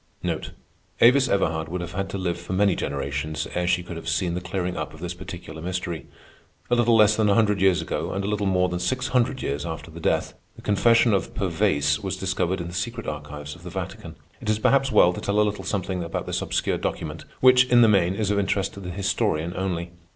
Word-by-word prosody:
Avis 130 +3 +6
Everhard 80 -5 0
would 90 +2 -3
have 85 - -6
had 95 +1 -3
to 100 - -4
live 90 -2 -2
for 85 +2 -5
many 100 0 +3
generations 70 +2 -3
ere 90 0 -1
she 90 0 +2
could 85 -1 -7
have 85 - -5
seen 90 -3 0
the 90 - -3
clearing 90 0 -3
up - - -5
of - - -14
this 90 +1 -4
particular 90 -3 -9
mystery. 90 -1 -4 0.6
A - - +5
little 120 -1 +4
less 110 -1 +6
than 110 -1 +2
a 100 - +4
hundred 105 -4 +2
years 95 -2 +4
ago, - - -3
and 95 +1 -2
a - - -2
little 105 -1 0
more 90 -1 +2
than 90 -1 -3
six 130 +9 -1
hundred 130 +1 +1
years 70 +1 -2
after 80 -1 -6
her 85 - -9
death, - - 0 0.2
the - - -14
confession 115 +2 +4
of 95 - -1
Pervaise 70 0 +1
was 95 -1 -4
discovered 95 -1 -1
in 85 - -4
the - - -9
secret 115 +6 -3
archives 75 0 -6
of - - -15
the - - -8
Vatican. - - -6 0.3
It - - -4
is 110 - +2
perhaps 135 +4 +3
well 90 -6 +5
to - - -6
tell 100 +1 0
a - - +6
little 105 0 -3
something 95 -3 -2
about 85 - -4
this - - -2
obscure - - -1
document, - - -4
which, 125 0 +6
in 125 -1 +5
the 115 - +7
main, 95 -3 +3
is 105 -1 0
of 100 - +2
interest 100 0 0
to - - -9
the 90 -2 -7
historian 95 -3 -1
only. 90 -2 -2
95 Hz, 230 wpm, -24 LUFS, 85-105 Hz, 0.6 s, the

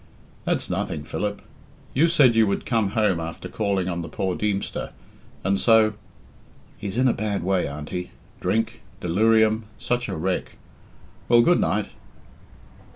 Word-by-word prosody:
"That's - - 0
nothing, 75 - -2
Philip. 100 +6 -3 0.5
You 155 +6 +4
said 145 -8 +5
you 115 -1 +4
would 100 - -1
come 110 -5 +1
home 105 -6 +3
after 80 0 -6
calling 100 -4 -1
on 85 -1 -2
the - - -6
poor 95 -2 -2
Deemster, 105 -2 -2 0.5
and 95 +1 +1
so 110 -2 +5 0.4
" - - -28
"He's 100 +2 -4
in 130 +1 +4
a 125 - +3
bad 100 -3 -2
way, 95 0 +1
Auntie. 75 +5 -5 0.3
Drink 115 0 -1 0.2
delirium 110 +4 +3
such 125 0 -1
a - - -3
wreck. 90 +3 -2 0.7
Well, 120 0 +7
good 175 +5 +4
night!" 105 +2 0
105 Hz, 150 wpm, -24 LUFS, 90-115 Hz, 0.7 s, Well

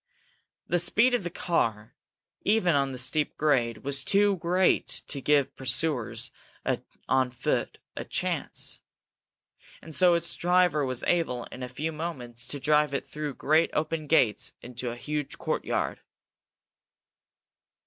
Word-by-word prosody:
The 175 - +1
speed 215 +9 +3
of 245 - +3
the 175 - -3
car, 115 - -1 0.5
even 205 -5 +3
on 140 -1 +2
the 130 - -6
steep 140 +4 0
grade, 120 -7 +1
was 140 0 0
too 200 +2 +3
great 180 +2 +2 0.2
to 140 - -2
give 145 -1 +2
pursuers 125 -4 0 0.8
on 130 -1 +3
foot 125 - -2 0.2
a - - -4
chance, - - -3 1.0
and 160 - -10
so 180 +1 +5
its 170 0 +1
driver 175 -4 +3
was 130 -1 -3
able, 140 -9 +1
in 130 - -8
a 125 - -4
few 150 +6 -3
moments, 125 -8 -4
to 145 - -5
drive 150 0 +3
it - - -2
through 150 -3 -5
great 155 +3 +3
open 155 0 -1
gates 125 -9 +2
into 125 0 -5
a 120 - -5
huge 150 +3 -4
courtyard. - - -2
150 Hz, 140 wpm, -28 LUFS, 125-170 Hz, 1.0 s, so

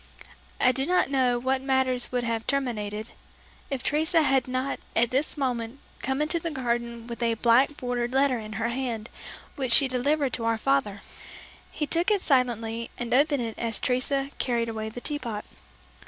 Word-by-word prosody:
I 255 - +5
do 265 +3 -1
not 360 -5 +2
know 250 -3 +2
how 260 +2 +1
matters 260 -2 +1
would 250 -1 0
have 230 -1 -2
terminated, 220 -6 -2 0.6
if 270 -3 -3
Teresa 320 +2 +2
had 265 -3 +2
not 255 +2 -2 0.2
at 235 0 +3
this 275 +4 0
moment 245 -3 -2 0.2
come 265 +3 0
into 325 +3 0
the 335 - -3
garden 235 -4 -2
with 235 0 -7
a 230 -1 +2
black 250 +6 +3
bordered 245 -1 -2
letter 265 -2 +2
in 215 -1 -7
her 225 +1 -1
hand 235 -3 -3 0.4
which 260 -3 -2
she 275 - +7
delivered 275 +2 +1
to 230 - -2
our 230 0 +2
father. 220 -5 0 0.7
He 300 - -3
took 335 +6 +1
it 415 -3 +2
silently 235 -4 +1
and 240 -1 -3
opened 285 -1 +3
it 225 -2 -5
as 230 -2 0
Teresa 270 +2 0
carried 235 -2 0
away 220 -1 -4
the 245 +3 -8
tea 295 +2 -3
pot. 225 -5 -5
250 Hz, 180 wpm, -26 LUFS, 230-275 Hz, 0.7 s, she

